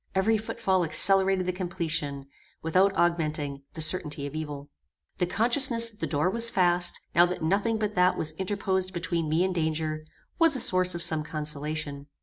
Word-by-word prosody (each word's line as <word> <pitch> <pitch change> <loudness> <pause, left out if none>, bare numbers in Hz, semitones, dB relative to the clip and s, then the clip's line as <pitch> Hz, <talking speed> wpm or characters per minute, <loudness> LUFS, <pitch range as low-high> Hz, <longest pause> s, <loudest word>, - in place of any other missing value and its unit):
Every 215 +4 +1
footfall 195 -4 -2
accelerated 190 +3 +6
the 180 - -1
completion, 160 -6 -3 0.4
without 185 +5 +1
augmenting, 150 -5 -2
the 160 - -2
certainty 155 -3 0
of 145 - -8
evil. 150 -2 -7 0.5
The 180 - 0
consciousness 230 +2 +4
that 210 - -25
the - - -3
door 150 +2 -1
was 230 +4 +3
fast, 175 -3 +1
now 175 +1 +4
that 180 -2 -6
nothing 205 +7 0
but 215 -1 -3
that 180 -1 +1
was 155 - -1
interposed 190 -1 -2
between 170 -2 -3
me 160 +3 +1
and 190 0 -2
danger, 155 -2 -3 0.4
was 330 -3 +4
a - - -2
source 185 -4 0
of 170 - -3
some 160 -3 +1
consolation. 150 -2 -5
175 Hz, 170 wpm, -26 LUFS, 155-190 Hz, 0.5 s, accelerated